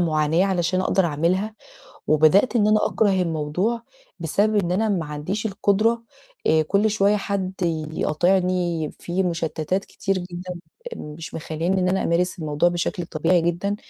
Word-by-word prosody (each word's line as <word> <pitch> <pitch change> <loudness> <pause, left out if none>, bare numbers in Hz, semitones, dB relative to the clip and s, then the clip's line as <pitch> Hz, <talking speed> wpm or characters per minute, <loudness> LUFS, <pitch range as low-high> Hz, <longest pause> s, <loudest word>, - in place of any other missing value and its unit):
معاناة 160 +1 +2
علشان 185 0 0
أقدر 190 0 +2
أعملها، 180 +8 0 0.5
وبدأت 160 - +4
إن 210 -1 +3
أنا 215 0 +3
أكره 210 -2 +2
الموضوع 175 +8 -1 0.4
بسبب 205 +7 +1
إن 180 -3 +1
أنا 220 +4 +1
ما 175 -6 0
عنديش 165 +9 -3
القدرة. 215 +3 +1 0.4
آآ 160 0 +4
كل 200 +7 +2
شوية 205 0 +3
حد 195 -2 -2 0.4
يقاطعني، 175 0 +1
في 180 +2 -1
مشتتات 170 +1 -1
كتير 195 -1 -2
جدًا 180 0 -6 0.4
مش 150 +2 -8
مخلّياني 165 +4 -1
إن 180 - +1
أنا 190 +1 +1
أمارس 180 +2 0
الموضوع 155 +2 +2
بشكل 175 0 -2
طبيعي 165 +2 +2
جدًا. 175 +4 -1
180 Hz, 145 wpm, -23 LUFS, 165-200 Hz, 0.5 s, وبدأت